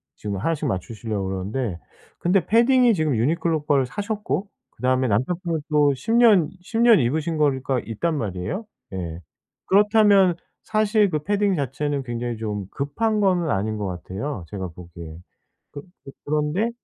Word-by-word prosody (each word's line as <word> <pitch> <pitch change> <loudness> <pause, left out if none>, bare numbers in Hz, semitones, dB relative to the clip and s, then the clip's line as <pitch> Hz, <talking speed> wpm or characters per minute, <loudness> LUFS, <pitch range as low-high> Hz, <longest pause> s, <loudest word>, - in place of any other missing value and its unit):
지금 100 -2 -4
1 165 - 0
씩 150 -1 -3
맞추시려고 105 0 -3
그러는데, 95 +1 -3 0.4
근데 180 0 +2
패딩이 240 +1 +4
지금 155 -6 0
유니클로 160 +4 0
걸 140 -3 +3
사셨고 205 - -3 0.2
그다음에 130 +1 0
남편분은 165 - -1
또 145 -2 +4
10 225 - -3
년 215 -9 +6
10 225 +5 -4
년 235 -2 +7
입으신 155 +7 -1
거가 135 -3 +1
있단 150 +8 -2
말이에요. 105 - -3 0.3
예. 85 -3 -5 0.5
그렇다면 205 -3 +5 0.3
사실 215 -1 +2
그 155 -3 -1
패딩 205 0 +1
자체는 140 0 -2
굉장히 120 -1 -4
좀 105 -3 -4
급한 215 +11 -1
거는 180 -5 +2
아닌 110 +3 -1
것 105 - -3
같아요, 95 - -5
제가 95 -3 -5
보기에. 85 -1 -11 0.5
그 145 - -8 0.2
그 135 - -9
그런데 150 +9 0
145 Hz, 305 characters per minute, -23 LUFS, -, 0.5 s, 년